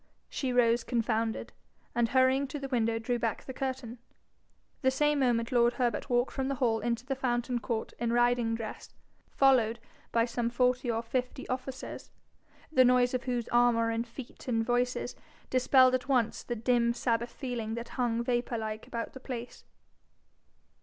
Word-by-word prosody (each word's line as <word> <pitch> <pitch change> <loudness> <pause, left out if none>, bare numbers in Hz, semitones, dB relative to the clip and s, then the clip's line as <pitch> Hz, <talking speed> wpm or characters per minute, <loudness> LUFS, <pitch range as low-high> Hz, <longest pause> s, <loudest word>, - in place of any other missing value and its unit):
She 260 -3 -2
rose 235 -1 +3
confounded, 230 -2 -1 0.4
and 235 -1 +1
hurrying 260 +2 +3
to 265 - -5
the 275 -1 -5
window 230 -3 +1
drew 240 +2 -1
back 230 -2 -2
the 260 - -6
curtain. 260 -3 -4 0.8
The 260 - +4
same 295 +2 +2
moment 235 -3 +1
lord 240 -1 +4
Herbert 240 0 -1
walked 245 +1 +2
from 265 -1 -2
the 275 - -1
hall 235 -4 +1
into 235 +1 -2
the 270 - -1
fountain 245 -2 -1
court 230 0 -3
in 235 0 0
riding 240 -1 +2
dress, 225 -2 -7 0.4
followed 245 -5 +4 0.3
by 230 0 +3
some 235 -1 -1
forty 250 +1 +1
or 230 0 0
fifty 250 +2 -3
officers, 255 +1 -5 0.6
the 260 -5 +6
noise 250 0 +4
of 255 0 -2
whose 245 -2 -1
armour 240 -1 +3
and 230 +1 -2
feet 245 +2 -10
and 225 -2 +1
voices 245 +1 0 0.4
dispelled 255 0 +5
at 255 +1 0
once 245 -5 +1
the 240 - -4
dim 235 +1 +2
Sabbath 235 -1 0
feeling 235 -5 -4
that 235 0 -6
hung 235 -2 -1
vapour 240 -1 -1
like 215 -1 -5
about 230 -1 -4
the 260 - -9
place. 245 -2 -7
240 Hz, 165 wpm, -30 LUFS, 230-255 Hz, 0.8 s, the